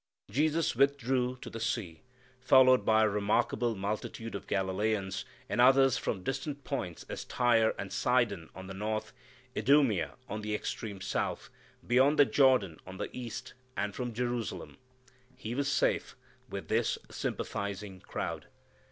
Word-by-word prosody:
Jesus 155 +5 +1
withdrew 130 -1 +2
to - - -7
the 115 - -6
sea, 105 -7 -2 0.4
followed 130 0 +6
by 110 0 +4
a - - +5
remarkable 105 +3 +1
multitude 105 +3 -4
of 100 - -6
Galileans, 95 0 -1 0.2
and 120 - +1
others 135 0 +6
from - - -1
such 95 - -13
distant 140 +1 -3
points 90 - -4
as - - -5
Tyre 115 -3 +3
and 95 - -5
Sidon 115 -9 +1
on 95 - -8
the 95 - -7
north, 110 +2 -3 0.4
Idumea 125 - +3
on 105 +1 -4
the 105 0 -2
extreme 105 -2 -5
south, - - -2 0.3
beyond 130 +5 +4
the 145 - +8
Jordan 130 - +3
on 95 0 -8
the - - -5
east, 125 +1 -6 0.2
and 105 - -1
from 125 -2 -3
Jerusalem. 120 0 -3 0.6
He 110 - -5
was 140 +2 0
safe - - +1 0.3
with - - -6
this - - +1
sympathizing 100 -1 -4
crowd. - - -4
115 Hz, 145 wpm, -31 LUFS, 100-130 Hz, 0.6 s, the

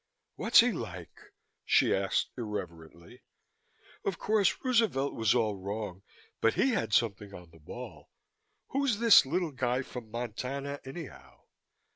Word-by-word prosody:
"What's - - +6
he - - +2
like?" - - -7 0.5
she - - +3
asked 95 0 0
irrelevantly. 85 -7 -7 0.8
"Of 190 -3 -2
course, 210 -3 +2
Roosevelt 225 - +1
was 110 0 +2
all 110 -4 +1
wrong 100 -1 -5 0.4
but 115 - +2
he 270 - +3
had 150 - -1
something 105 -3 0
on 90 -2 -13
the 80 - -18
ball. 75 - -10 0.6
Who's 275 -5 0
this 230 - +7
little 170 +2 -1
guy 130 -1 -1
from 125 -4 -9
Montana, 130 +5 -4
anyhow?" 140 +3 -10
120 Hz, 130 wpm, -30 LUFS, 105-165 Hz, 0.8 s, this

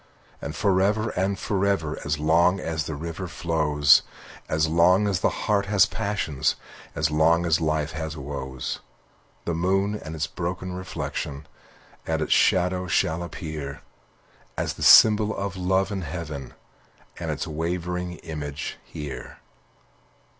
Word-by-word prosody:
And 75 +1 -5
forever 100 +4 +2
and 95 +2 0
forever, 100 -6 0
As 75 +1 -1
long 85 +5 +3
as 80 -3 -2
the 80 - -4
river 85 +4 -5
flows, 75 -4 +3 0.5
As 80 0 +2
long 90 +5 +4
as 95 -3 +1
the - - +2 0.2
heart 100 -2 +2
has 100 -2 +5
passions, 100 -10 -1 0.4
As 75 -1 +1
long 80 +3 +3
as 80 -1 +2
life 75 -1 0
has 80 0 -5
woes; 65 -2 -5 0.7
The 85 - -1
moon 95 +4 +1
and 80 -6 -6
its 80 - -1
broken 90 +1 -4
reflection 90 -5 -5 0.6
Aand 80 -1 0
its - - +2
shadows 90 0 +2
shall 80 +2 +1
appear, 75 -3 -6 0.8
As - - -1
the - - -12
symbol 110 0 +7
of 100 -1 -3
love 95 +2 +1
in 95 -2 -2
heaven, 75 -4 -6 0.6
And - - -4
its - - -2
wavering 90 +3 -3
image 75 -3 -5
here. 75 -2 -8
85 Hz, 135 wpm, -25 LUFS, 75-95 Hz, 0.8 s, symbol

